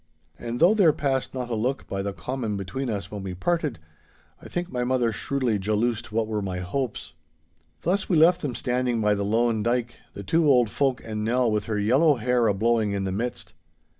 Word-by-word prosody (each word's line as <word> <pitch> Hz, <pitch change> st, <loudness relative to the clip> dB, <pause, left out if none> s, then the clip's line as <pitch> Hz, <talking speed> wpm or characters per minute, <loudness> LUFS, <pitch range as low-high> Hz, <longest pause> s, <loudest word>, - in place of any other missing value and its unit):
And 120 Hz, 0 st, -4 dB
though 175 Hz, +5 st, +6 dB
there 190 Hz, -8 st, +5 dB
passed 135 Hz, -3 st, -1 dB
not 125 Hz, -1 st, -4 dB
a -, -, 0 dB
look 125 Hz, +5 st, -1 dB
by 95 Hz, -, -3 dB
the 100 Hz, +1 st, -2 dB
common 105 Hz, +4 st, -4 dB
between 100 Hz, +8 st, -4 dB
us 100 Hz, -3 st, -4 dB
when 105 Hz, -1 st, -5 dB
we 95 Hz, -1 st, -5 dB
parted, 160 Hz, -, -1 dB, 0.6 s
I -, -, -10 dB
think 175 Hz, 0 st, -4 dB
my 125 Hz, -1 st, -1 dB
mother 125 Hz, -2 st, +1 dB
shrewdly 125 Hz, -2 st, -1 dB
jaloosed 110 Hz, +3 st, -1 dB
what 110 Hz, +1 st, 0 dB
were 110 Hz, -1 st, -2 dB
my 95 Hz, -2 st, -3 dB
hopes. 105 Hz, -, -4 dB, 0.7 s
Thus 190 Hz, +4 st, 0 dB
we 175 Hz, -, +3 dB
left 170 Hz, +3 st, +5 dB
them 135 Hz, -6 st, -3 dB
standing 125 Hz, -2 st, 0 dB
by 105 Hz, -1 st, +3 dB
the 100 Hz, 0 st, -1 dB
loan 115 Hz, +2 st, +1 dB
dyke, 120 Hz, +1 st, -1 dB, 0.2 s
the 100 Hz, -, -6 dB
two 160 Hz, -, +2 dB
old 125 Hz, -5 st, +4 dB
folk 135 Hz, -3 st, 0 dB
and 110 Hz, -1 st, -4 dB
Nell 120 Hz, +1 st, +2 dB
with 105 Hz, -1 st, -1 dB
her 110 Hz, -1 st, -2 dB
yellow 135 Hz, +9 st, +4 dB
hair 125 Hz, 0 st, +1 dB
a 105 Hz, -, +3 dB
blowing 110 Hz, 0 st, +1 dB
in 100 Hz, -1 st, -1 dB
the 95 Hz, -, -2 dB
midst. 115 Hz, +6 st, -4 dB
120 Hz, 210 wpm, -25 LUFS, 105-130 Hz, 0.7 s, though